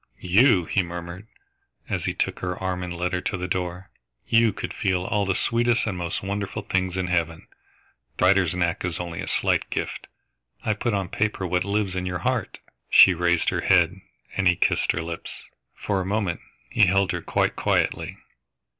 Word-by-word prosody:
"You!" 95 Hz, 0 st, +4 dB
he 95 Hz, -, +1 dB
murmured, 85 Hz, +3 st, -7 dB, 0.6 s
as -, -, -2 dB
he -, -, 0 dB
took -, -, -1 dB
her 90 Hz, -1 st, -3 dB
arm 95 Hz, -1 st, -3 dB
and 90 Hz, -1 st, -5 dB
led 90 Hz, +1 st, -2 dB
her 90 Hz, -, 0 dB
to 100 Hz, -, -2 dB
the 90 Hz, 0 st, -4 dB
door. 90 Hz, +1 st, -3 dB, 0.4 s
"You 115 Hz, -1 st, +4 dB
could -, -, -6 dB
feel 95 Hz, -2 st, 0 dB
all 100 Hz, 0 st, 0 dB
the 95 Hz, -, +1 dB
sweetest 120 Hz, 0 st, +2 dB
and 105 Hz, -4 st, -2 dB
most 85 Hz, 0 st, -3 dB
wonderful 100 Hz, +1 st, -3 dB
things 95 Hz, -2 st, -1 dB
in 95 Hz, -, 0 dB
heaven. 85 Hz, -2 st, -1 dB, 0.7 s
The -, -, +2 dB
writer's 95 Hz, -2 st, +3 dB
knack 85 Hz, -2 st, 0 dB
is 90 Hz, -2 st, -2 dB
only 85 Hz, -1 st, -5 dB
a -, -, -5 dB
slight -, -, +1 dB
gift. -, -, -4 dB, 0.6 s
I 110 Hz, -, +2 dB
put 105 Hz, +1 st, -1 dB
on 95 Hz, -3 st, -2 dB
paper 105 Hz, -3 st, -1 dB
what 90 Hz, 0 st, 0 dB
lives 100 Hz, -2 st, -1 dB
in 90 Hz, 0 st, -2 dB
your 90 Hz, 0 st, -2 dB
heart." -, -, -1 dB, 0.3 s
She 95 Hz, -, +8 dB
raised 85 Hz, 0 st, +2 dB
her -, -, -1 dB
head, 90 Hz, +1 st, +3 dB, 0.3 s
and 95 Hz, -1 st, +2 dB
he 90 Hz, -, +5 dB
kissed -, -, +2 dB
her 85 Hz, -, -3 dB
lips. 85 Hz, 0 st, -6 dB, 0.3 s
For 100 Hz, -2 st, -1 dB
a -, -, -4 dB
moment 100 Hz, -4 st, -1 dB, 0.3 s
he 110 Hz, -4 st, +5 dB
held 95 Hz, +1 st, +2 dB
her 85 Hz, -, -3 dB
quite -, -, 0 dB
quietly. -, -, 0 dB
90 Hz, 190 wpm, -24 LUFS, 90-100 Hz, 0.7 s, She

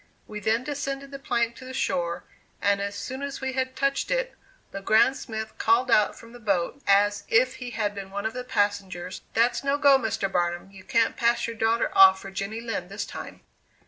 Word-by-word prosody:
We 210 Hz, -, -7 dB
then 220 Hz, +4 st, +1 dB
descended 275 Hz, -1 st, -4 dB
the 275 Hz, -, -7 dB
plank 235 Hz, -3 st, 0 dB
to -, -, -11 dB
the 260 Hz, 0 st, -7 dB
shore, 175 Hz, -9 st, -1 dB, 0.4 s
and 200 Hz, 0 st, +2 dB
as 200 Hz, 0 st, -3 dB
soon 260 Hz, +6 st, -5 dB
as 280 Hz, -1 st, -4 dB
we 265 Hz, -1 st, -3 dB
had 260 Hz, 0 st, -2 dB
touched 275 Hz, +1 st, 0 dB
it, -, -, 0 dB, 0.4 s
Le 195 Hz, -, -5 dB
Grand 220 Hz, +6 st, +4 dB
Smith 220 Hz, -3 st, -6 dB
called 235 Hz, +3 st, +3 dB
out 210 Hz, -, +4 dB
from 230 Hz, +1 st, -14 dB
the 245 Hz, -, -11 dB
boat, 200 Hz, +4 st, -1 dB
as 205 Hz, +1 st, +3 dB
if 255 Hz, +3 st, +3 dB
he 250 Hz, -1 st, -6 dB
had 215 Hz, -3 st, -2 dB
been 195 Hz, -1 st, -7 dB
one 200 Hz, +1 st, -5 dB
of 220 Hz, -, -1 dB
the 250 Hz, 0 st, -5 dB
passengers, 200 Hz, -6 st, -2 dB
"That's 235 Hz, +4 st, +2 dB
no 275 Hz, +1 st, +1 dB
go, 280 Hz, -2 st, +6 dB
Mr. 225 Hz, -4 st, -1 dB
Barnum; 175 Hz, 0 st, -1 dB
you 190 Hz, -1 st, -13 dB
can't 230 Hz, +3 st, +1 dB
pass 235 Hz, -1 st, +2 dB
your 230 Hz, -, -5 dB
daughter 225 Hz, +1 st, +1 dB
off 190 Hz, 0 st, +8 dB
for 195 Hz, -, -9 dB
Jenny 200 Hz, +4 st, -4 dB
Lind 230 Hz, -1 st, -4 dB
this -, -, -4 dB
time." -, -, -9 dB
225 Hz, 210 wpm, -26 LUFS, 200-260 Hz, 0.4 s, off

